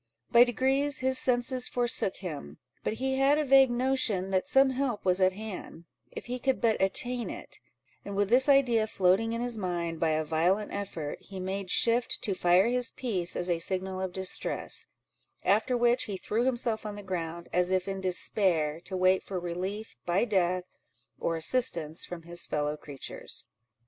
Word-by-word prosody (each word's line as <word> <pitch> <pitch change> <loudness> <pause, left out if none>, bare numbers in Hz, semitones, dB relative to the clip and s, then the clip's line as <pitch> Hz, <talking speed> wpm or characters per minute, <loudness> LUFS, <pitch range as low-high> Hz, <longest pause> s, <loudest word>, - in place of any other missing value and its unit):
By 235 - +8
degrees 265 +3 +1
his 260 0 +4
senses 250 0 +1
forsook 240 -5 0
him; 145 - -7 0.3
but - - -1
he 265 +3 -2
had 275 +2 +4
a 305 - 0
vague 270 -1 +6
notion 240 -6 0
that 185 +6 0
some 270 -2 +4
help 255 -6 -2
was 185 0 +2
at 185 0 +4
hand, 190 -5 -8 0.2
if - - -9
he 250 +1 -4
could 265 +1 0
but 225 -4 +1
attain 240 +5 0
it; - - -9 0.4
and 200 - -6
with 200 0 +1
this 255 +6 +4
idea 245 -6 +4
floating 195 +3 +2
in 230 - -3
his 240 -2 -1
mind, 170 -3 -3
by 165 - +1
a 155 0 0
violent 175 +7 0
effort 170 -7 -5
he 195 -1 -9
made 190 +1 -4
shift 235 +5 +2
to 200 - +2
fire 180 +1 +3
his 250 0 +1
piece 190 -9 0
as 175 - -1
a 170 -2 0
signal 185 +2 -2
of 190 -1 -3
distress; 190 0 -1 0.6
after 215 +6 +2
which, 240 +1 +2
he 200 -2 -5
threw 225 +6 -1
himself 235 -3 0
on 210 -1 -6
the 205 - -9
ground, 170 -2 -5
as 180 0 +2
if 185 0 0
in 195 -1 -4
despair, 175 -4 +1
to 185 +1 -4
wait 185 +1 +3
for 190 -2 -5
relief 185 +5 -5
by 180 +6 +2
death, 185 -4 +1 0.6
or 165 - -1
assistance 165 -4 0
from 175 -2 -8
his 175 +1 -4
fellow 150 0 -1
creatures. 145 -3 -7
195 Hz, 180 wpm, -29 LUFS, 180-245 Hz, 0.6 s, By